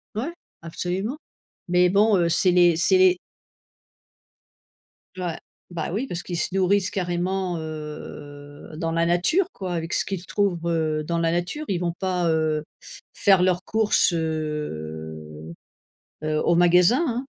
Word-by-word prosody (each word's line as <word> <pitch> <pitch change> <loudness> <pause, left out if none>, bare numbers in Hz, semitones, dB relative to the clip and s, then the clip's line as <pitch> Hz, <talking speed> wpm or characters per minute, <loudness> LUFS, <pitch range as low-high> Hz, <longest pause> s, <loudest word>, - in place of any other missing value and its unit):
Ouais, 265 +11 -3 0.3
absolument. 185 - -3 0.5
Mais 180 0 +4
bon, 205 +3 +4
heu, 170 -1 +2
c'est 175 +2 +3
les 175 -1 +5
c'est 370 - +4
les 370 -1 +5 2.0
Ouais, 175 -3 -3 0.3
bah 170 -3 -4
oui, 235 +7 -2
parce 175 -6 -5
qu'ils 175 -2 -4
se - - -2
nourrissent 195 +1 +2
carrément, 180 0 -2
heu, 150 -2 -8
dans 165 0 -2
la 165 0 +1
nature 175 - +2
quoi, 185 -2 -5
avec 165 0 -3
ce - - +2
qu'ils 190 -2 -5
trouvent, 200 -4 0
heu, 155 -2 0
dans 170 +1 -1
la 165 0 +1
nature. 175 - -2
Ils 190 - 0
vont 170 -1 -1
pas, 180 -2 -1
heu, 155 -1 +1 0.5
faire 195 -2 +4
leurs 180 0 +1
courses, 215 -3 +2
heu 80 - -5 0.7
heu, 155 0 0
au 170 - +3
magasin, 180 - +5
hein. 250 +1 -2
175 Hz, 145 wpm, -24 LUFS, 160-190 Hz, 2.0 s, les